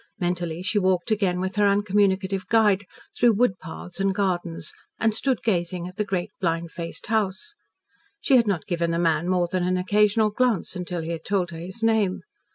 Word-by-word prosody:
Mentally 175 -2 -2
she 205 +2 +1
walked 185 +2 +1
again 195 -4 +1
with 190 +2 -3
her 205 -1 +4
uncommunicative 195 -1 +1
guide, 205 -3 +3 0.3
through 235 -3 +4
woodpaths 185 -5 -2
and 195 -1 +1
gardens, 175 -5 -2 0.3
and 225 -1 +2
stood 255 +2 0
gazing 175 -4 -1
at 180 - -10
the 210 - +1
great 185 -3 -3
blind 165 -1 -1
faced 170 -1 -6
house. 210 -4 -1 0.7
She 275 - +3
had 235 -3 +4
not 190 -6 -1
given 170 -1 -1
the 170 - 0
man 165 0 +1
more 180 -1 +2
than 185 +1 -1
an 180 +1 +1
occasional 210 +3 +2
glance 245 -2 0
until 180 -1 -4
he 165 - -4
had 165 -1 -5
told 190 -4 -1
her 165 - -7
his 190 +7 -7
name. 220 -4 +2
190 Hz, 185 wpm, -24 LUFS, 175-210 Hz, 0.7 s, her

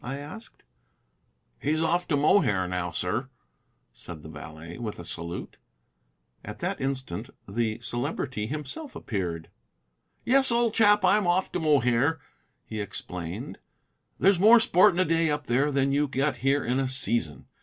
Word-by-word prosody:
I 135 +3 -4
asked. 155 +11 -11 1.0
"He's 155 +3 0
off 175 +2 +1
to 145 - +1
Mohair 120 - +3
now, 90 -1 -2
sir," 100 - -2 0.6
said 80 -3 -10
the 80 - -10
valet, 80 +2 -10
with 110 -3 -5
a 85 - -9
salute. 85 +1 -6 0.9
At - - -8
that - - -3
instant 130 -9 -3 0.2
the 110 +2 -2
Celebrity 120 -2 -3
himself 155 - -5
appeared. 85 -6 -4 0.7
"Yes, 265 +1 +4
old 235 -1 +2
chap, 205 -3 +4
I'm 200 0 +3
off 180 +2 +1
to 180 - -2
Mohair," 145 -1 +2 0.5
he 110 -1 -5
explained. 90 -4 -6 0.6
"There's 195 -2 +4
more 225 +5 +8
sport 195 -3 +5
in - - -1
a 185 - +3
day 165 -1 +2
up 150 -1 -2
there 135 +5 +1
than 140 0 +1
you 145 +1 +2
get 135 0 -1
here 135 +3 +1
in 125 +2 0
a 135 - 0
season. 115 - 0
135 Hz, 155 wpm, -27 LUFS, 105-165 Hz, 1.0 s, more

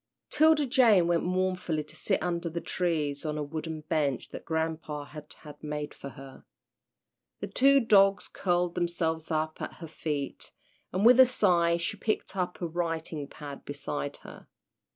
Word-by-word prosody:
'Tilda 310 0 +5
Jane 240 - +5
went 170 -1 +2
mournfully 185 -3 -1
to 155 - -12
sit 155 - 0
under 170 -1 -1
the 170 +1 -3
trees 155 -6 -1
on 155 -1 -2
a 150 - -1
wooden 155 +1 -5
bench 150 -4 -1
that - - -8
grampa 160 -2 -2
had 150 0 -11
had 150 -1 -12
made 150 0 -4
for 140 - -8
her. 135 0 -12 1.0
The - - -3
two 275 +1 +5
dogs 195 -5 +4
curled 175 -1 0
themselves 170 -2 -1
up 155 -1 -1
at - - -4
her 165 - -9
feet, 150 -3 -4 0.4
and 190 +4 0
with 250 +2 +8
a 260 - +11
sigh 175 -8 +3
she 185 +5 -2
picked 215 -1 -2
up 180 -1 -2
a - - 0
writing 165 -3 -3
pad 145 -1 -9
beside 145 0 -4
her. - - -12
165 Hz, 165 wpm, -29 LUFS, 150-185 Hz, 1.0 s, a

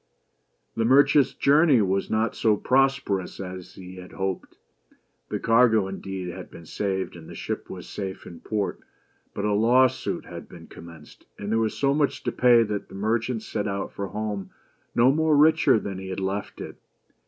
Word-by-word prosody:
The 115 - 0
merchant's 140 +3 +4
journey 145 -2 +4
was 95 -1 0
not 110 +1 0
so 110 -2 +2
prosperous 130 -8 +1
as 90 -1 -8
he 95 0 -11
had 90 0 -11
hoped. 95 -1 -4 0.7
The - - -2
cargo, 115 -3 +4
indeed, 95 -1 -6
had - - -8
been 85 - -13
saved, 95 +1 -3
and 80 -2 -12
the - - -9
ship - - -5
was - - -8
safe 95 -2 -6
in 85 - -10
port; 105 -2 -3 0.6
but 100 - -2
a 105 - +1
law 120 +5 +5
suit 130 0 -3
had - - -10
been - - -12
commenced, 85 -3 -14
and 100 +1 -5
there 115 - +2
was 110 -1 -1
so 140 0 +2
much 145 -1 0
to - - -1
pay 120 -2 +5
that 105 -2 -4
the - - -11
merchant 110 +3 -1
set 105 -1 -3
out 100 0 -3
for 100 - -5
home 105 -2 -4 0.5
no 125 +3 +5
much 160 +3 0
richer 155 -3 +5
than 100 -3 -5
he 95 0 -7
had 95 - -4
left 95 +1 -4
it. - - -8
105 Hz, 185 wpm, -25 LUFS, 95-125 Hz, 0.7 s, law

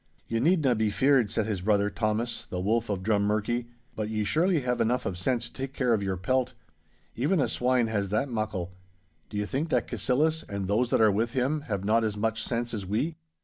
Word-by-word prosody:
'Ye 115 - -1
needna 150 -2 +3
be 110 -2 +1
feared,' 130 0 +3
said 110 - 0
his 105 -4 -2
brother 105 +1 +2
Thomas, 110 +3 -2
the 90 - -4
Wolf 110 +4 0
of 95 -2 -2
Drummurchie, 105 +3 +1 0.3
'but 110 -1 -3
ye 110 -1 -1
surely 165 - +2
have 125 -1 -1
enough 125 +3 +1
of 95 - -2
sense 120 +6 0
to - - -11
take 135 0 -5
care 125 -4 +1
of 110 - +1
your 95 -1 -2
pelt. 130 +7 0 0.6
Even 150 +9 +1
a 135 - +2
swine 125 -1 +2
has 105 -3 -1
that 110 +7 0
muckle. 110 -7 -3 0.6
Do 105 - -5
you 105 - 0
think 140 +9 -2
that - - +1
Cassillis, 140 +9 +1
and 100 -2 -3
those 115 +5 +1
that - - +2
are 110 -1 +6
with 115 +4 0
him, 135 +4 0
have 100 -3 -2
not 115 +2 +3
as 105 -2 -1
much 110 +1 -1
sense 120 0 -2
as 105 -3 -3
we? 115 - -1
115 Hz, 220 wpm, -28 LUFS, 105-125 Hz, 0.6 s, are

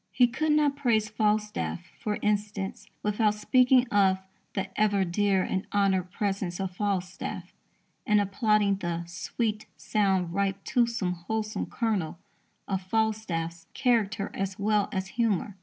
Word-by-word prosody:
He 250 - +5
could 305 +5 0
not 295 -2 +3
praise 230 -7 +1
Falstaff, 210 -4 -1
for 210 -1 -2
instance, 205 -1 -1 0.2
without 210 0 +2
speaking 250 +4 +4
of 195 -3 +4 0.4
"the 195 -1 -2
ever 205 -2 +2
dear 190 +1 +2
and 190 - -2
honoured 190 -3 +2
presence 195 -3 -2
of 190 -2 -3
Falstaff," 190 -2 -3 0.5
and 210 -1 +5
applauding 205 -1 +2
the 170 -3 -3
"sweet, 210 +5 -3
sound, 190 -5 +1
ripe 195 0 -1
toothsome, 235 -6 +1 0.2
wholesome 220 0 -2
kernel" 205 -9 -1 0.5
of 190 -1 -1
Falstaff's 185 -5 -1
character 225 -5 +1
as 195 -1 -3
well 210 0 +1
as 190 0 -2
humour. 210 -4 0
205 Hz, 130 wpm, -28 LUFS, 190-220 Hz, 0.5 s, He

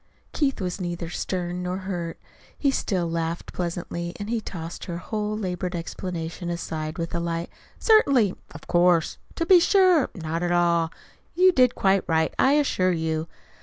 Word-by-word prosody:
Keith 275 -5 0
was 185 0 -3
neither 175 -1 -4
stern 180 0 -3
nor 180 +1 -2
hurt. 175 -3 -4 0.4
He 280 - +2
still 185 -9 -1
laughed 165 0 -3
pleasantly, 170 0 -4
and 205 +2 -4
he 235 -2 0
tossed 170 -4 -7
her 170 -3 -4
whole 210 +3 -3
labored 180 -2 -3
explanation 170 0 -5
aside 160 -2 -4
with 165 0 -4
a 170 - 0
light: 170 0 -3 0.3
"Certainly 275 - +4 0.2
of 160 - -12
course 175 -2 +3 0.2
to 335 - -1
be 360 +1 +7
sure 365 -4 +4
not 165 -2 -3
at 175 0 0
all! 170 -1 +3 0.5
You 370 +2 +6
did 255 -6 +4
quite 195 0 +3
right, 160 -1 +1
I 265 - +5
assure 260 -11 +2
you!" 160 -1 -1
175 Hz, 165 wpm, -25 LUFS, 170-215 Hz, 0.5 s, be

